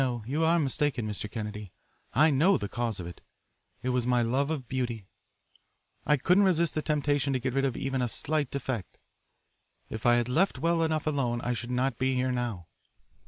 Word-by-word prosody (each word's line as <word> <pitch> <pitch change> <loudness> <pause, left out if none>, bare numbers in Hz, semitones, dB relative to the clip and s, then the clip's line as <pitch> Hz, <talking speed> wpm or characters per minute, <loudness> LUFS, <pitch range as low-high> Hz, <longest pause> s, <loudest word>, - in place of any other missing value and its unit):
"No, 120 -4 -1
you 145 +7 0
are 165 +1 +4
mistaken, 145 -5 0
Mr. 105 0 -4
Kennedy. 105 -3 -6 0.4
I 155 +1 +4
know 165 +9 +4
the 100 - -4
cause 115 -1 -3
of 90 - -5
it. 85 - -9 0.6
It 130 - -1
was 125 -1 0
my 125 -1 +3
love 135 +5 +1
of 140 -6 -3
beauty. 120 -5 -3 1.0
I 150 - +4
couldn't 180 +9 +4
resist 170 -3 +2
the 155 - -1
temptation 145 -2 0
to 130 - +1
get 130 0 -2
rid 135 +1 +1
of 130 - -1
even 135 -1 -1
a 125 - +1
slight 145 +3 -1
defect. 130 -8 -4 0.9
If 110 +2 -2
I 120 - +6
had 120 -1 +1
left 160 +4 +2
well 165 +4 +1
enough 160 -1 0
alone 135 -6 0
I 125 - -1
should 120 0 -5
not 125 0 0
be 130 0 +1
here 130 0 +1
now. 120 -8 -3
130 Hz, 200 wpm, -29 LUFS, 120-150 Hz, 1.0 s, I